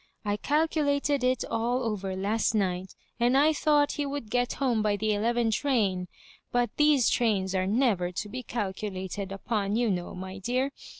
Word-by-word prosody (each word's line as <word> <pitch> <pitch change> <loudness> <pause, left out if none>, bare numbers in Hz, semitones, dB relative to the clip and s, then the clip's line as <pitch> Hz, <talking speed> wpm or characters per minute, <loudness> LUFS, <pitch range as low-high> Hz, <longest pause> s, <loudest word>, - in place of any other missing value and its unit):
I 205 0 +1
calculated 290 0 +1
it 255 -1 +1
all 240 +3 -1
over 195 -4 -2
last 210 +4 0
night, 185 -2 -1 0.2
and 245 +3 +3
I 305 +3 +5
thought 295 -1 +3
he 290 - -2
would 275 -6 -5
get 245 0 +1
home 245 -5 0
by 210 -1 +1
the 215 +1 0
eleven 230 +2 +1
train; 210 -8 +1 0.4
but 245 -2 +1
these 295 -4 +4
trains 200 -6 +1
are 185 0 0
never 205 -5 +1
to 210 - -3
be 255 +5 -5
calculated 195 -3 -4
upon, 200 0 -2
you 235 -2 +2
know, 180 -1 -3
my 190 +1 -7
dear. 255 +7 0
225 Hz, 170 wpm, -28 LUFS, 195-255 Hz, 0.4 s, I